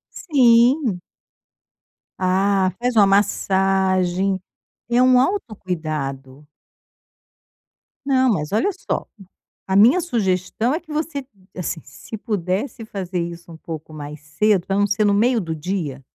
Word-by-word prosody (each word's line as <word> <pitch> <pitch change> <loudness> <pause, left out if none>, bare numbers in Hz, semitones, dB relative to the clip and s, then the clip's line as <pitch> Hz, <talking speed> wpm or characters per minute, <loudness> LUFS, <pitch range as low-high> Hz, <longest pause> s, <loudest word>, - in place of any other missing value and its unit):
Sim. 245 - +3 1.2
Ah, 190 +1 +2
faz 245 -1 -1
uma 205 -2 +7
massagem, 190 -1 +1 0.5
é 240 +1 +4
um 255 0 +5
autocuidado. 155 - -4 1.6
Não, 260 -2 +3
mas, 150 -7 -2
olha 220 - +2 0.2
só, - - -1 0.6
a 190 - 0
minha 240 - +6
sugestão 220 - -1
é 315 - -1
que 310 - -15
você, 300 -2 -3 0.3
assim, 175 -2 -4
se 220 - -10
pudesse 210 +3 -3
fazer 190 -4 -4
isso 170 0 -6
um 165 - -10
pouco 160 -1 -8
mais 150 0 -8
cedo 185 +5 +1
pra 195 - 0
não 205 0 +3
ser 205 +1 +1
no 205 - +3
meio 235 +4 +3
do 165 -3 -4
dia 155 -5 -4
195 Hz, 125 wpm, -21 LUFS, 175-235 Hz, 1.6 s, uma